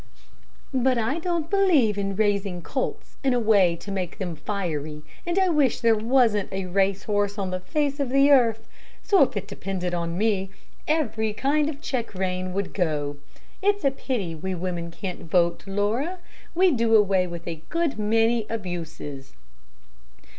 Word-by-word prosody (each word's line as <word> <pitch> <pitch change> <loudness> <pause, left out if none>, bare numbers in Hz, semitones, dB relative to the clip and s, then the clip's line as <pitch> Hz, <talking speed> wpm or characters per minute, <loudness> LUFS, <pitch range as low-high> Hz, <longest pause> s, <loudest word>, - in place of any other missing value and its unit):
"But 260 -1 +2
I 235 +8 0
don't 335 -2 -1
believe 330 - +3
in 195 -1 -2
raising 200 -4 0
colts 260 +7 -4
in 265 -2 +3
a - - +2
way 200 -6 +4
to 200 +4 -8
make 185 -3 -3
them 180 -4 -4
fiery, 155 -4 -4 0.2
and 345 +2 0
I 380 -1 +4
wish 295 -7 +2
there 230 -1 +4
wasn't 225 -2 +2
a 190 -1 -3
race 195 +1 +1
horse 205 -1 0
on 190 -2 -2
the 185 - -2
face 285 +9 -1
of 275 -3 0
the 275 +2 +5
earth, 230 -5 +4 0.4
so 400 - +4
if - - +3
it - - -4
depended 180 -2 -4
on 170 0 -2
me, 200 -2 +1 0.4
every 225 -9 0
kind 290 +7 +1
of 295 -1 -7
check 245 -8 -3
rein 185 0 -2
would 195 +1 -3
go. 150 -6 -1 0.4
It's 405 -3 +1
a 275 - +4
pity 235 -10 -3
we 185 +4 -4
women 175 -1 -3
can't 180 +1 -6
vote, 170 0 +2
Laura. 220 - -1 0.4
We'd 355 -5 +4
do 225 -1 +3
away 195 -3 +4
with 170 0 -8
a 165 -2 -5
good 335 -7 -1
many 225 +1 +2
abuses." 165 -9 -6
205 Hz, 170 wpm, -25 LUFS, 185-265 Hz, 0.4 s, the